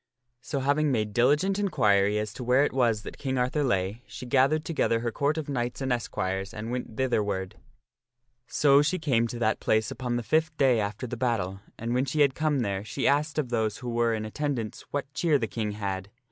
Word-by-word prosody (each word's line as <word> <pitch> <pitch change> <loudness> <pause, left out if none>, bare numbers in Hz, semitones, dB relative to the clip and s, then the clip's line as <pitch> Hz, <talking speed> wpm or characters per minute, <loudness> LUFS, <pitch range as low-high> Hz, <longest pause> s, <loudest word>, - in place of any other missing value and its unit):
So, 140 - -3
having 145 +2 +2
made 105 -4 -1
diligent 150 - +3
inquiry 105 - +3
as 105 -1 -3
to 125 - -7
where 125 +3 +4
it - - +2
Arthur - - -10
was 115 -5 +2
that - - -9
King 130 -2 -2
Arthur 125 +4 +1
lay, 100 -3 0
she - - -8
gathered 135 +5 +2
together 115 -8 +1
her 120 0 -1
Court 145 +5 0
of 155 - -3
knights 125 -3 -2
and 135 -2 0
esquires 95 -4 -3
and 110 +2 -5
went 125 -3 -5
thitherward. 105 -6 -1 0.9
So 140 -1 +4
she 155 +5 +1
came 130 -8 +1
to 120 - -6
that 110 -2 +1
place 110 0 +1
upon 125 -2 -3
the 120 - -2
fifth 155 +6 +1
day 130 -4 +4
after 105 +4 -3
the 120 0 -5
battle, 105 -6 -1 0.2
and 115 +1 -3
when 125 +2 +2
she 150 +3 0
had 140 -2 +4
come 150 -3 0
there 100 -3 -2
she 130 +5 -2
asked 150 +3 +1
of 145 -5 0
those 110 -3 0
who 125 - -6
were 115 -1 +1
in 110 0 -4
attendance 120 -2 -3
what 140 -1 -4
cheer 160 -3 +2
the 120 - -1
King 105 -1 -3
had. 100 -2 -4
120 Hz, 215 wpm, -27 LUFS, 110-140 Hz, 0.9 s, where